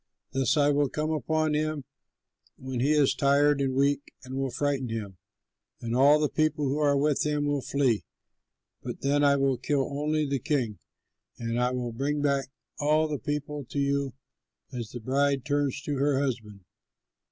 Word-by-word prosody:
Thus 135 +3 +1
I 145 0 +4
will 145 -1 +2
come 155 +1 -2
upon 155 0 0
him 155 -2 -1 0.7
when 130 -1 -5
he 140 +5 +2
is 145 -3 +4
tired 140 +1 +3
and 135 -1 0
weak 140 +1 +2 0.2
and 130 0 -9
will 135 0 -1
frighten 135 -2 -1
him, 105 -4 -5 0.6
and 115 0 -3
all 140 +4 +6
the 150 - +2
people 155 -1 0
who 140 +3 -1
are 145 -2 +3
with 145 0 +2
him 150 -1 0
will 145 -1 0
flee. 130 -4 +1 0.8
Then 145 +1 0
I 140 0 +5
will 135 -2 +1
kill 135 +1 0
only 150 +2 0
the 140 -1 -1
king, 125 -7 -1 0.6
and 115 +1 -2
I 125 - +2
will 125 -1 -3
bring 140 +5 -1
back 140 -2 +1 0.3
all 155 +1 +3
the 150 -3 -3
people 145 +2 -3
to 140 - -8
you 140 -2 0 0.6
as 120 -4 -5
the 120 - -7
bride 135 +2 +1
turns 145 -2 0
to 145 -2 -2
her 140 0 +2
husband. 115 -7 -3
140 Hz, 175 wpm, -27 LUFS, 130-145 Hz, 0.8 s, all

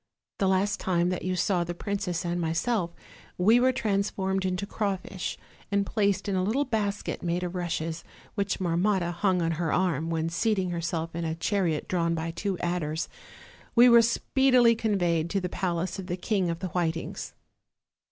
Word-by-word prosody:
The 195 - +2
last 195 +2 +1
time 175 -1 +1
that 180 - -2
you 185 0 -1
saw 180 -1 +1
the 175 0 -5
prin 200 +3 -3
cess 180 -3 -2
and 175 0 -1
myself, 170 +4 0 0.5
we 220 +7 +5
were 255 +1 +4
transformed 195 -5 -1
into 185 +1 -1
crawfish, 195 -3 -3 0.3
and 200 0 +2
placed 200 -2 0
in 200 - 0
a 185 - +2
little 230 +10 +1
basket 210 -4 -2
made 175 +1 -1
of 180 0 -3
rushes, 165 -2 -3 0.3
which 200 -1 -1
Marmotta 180 0 +1
hung 180 +1 +1
on 165 - +1
her 165 - 0
arm, 165 -4 +1
when 165 -1 0
seating 190 +1 0
herself 170 -1 -2
in 170 - -2
a 160 -1 -2
chariot 170 -2 0
drawn 170 -2 +1
by 165 0 -3
two 190 +2 -2
adders, 170 -2 -2 0.7
we 240 +1 +8
were 235 -1 +8
speedily 245 +1 +4
conveyed 175 -7 +1
to 195 - 0
the 180 -1 -3
palace 180 +1 -2
of 185 - -6
the 175 0 -2
King 190 -2 0
of 165 0 -3
the 185 - -2
Whitings. 165 -1 -3
185 Hz, 180 wpm, -27 LUFS, 170-200 Hz, 0.7 s, we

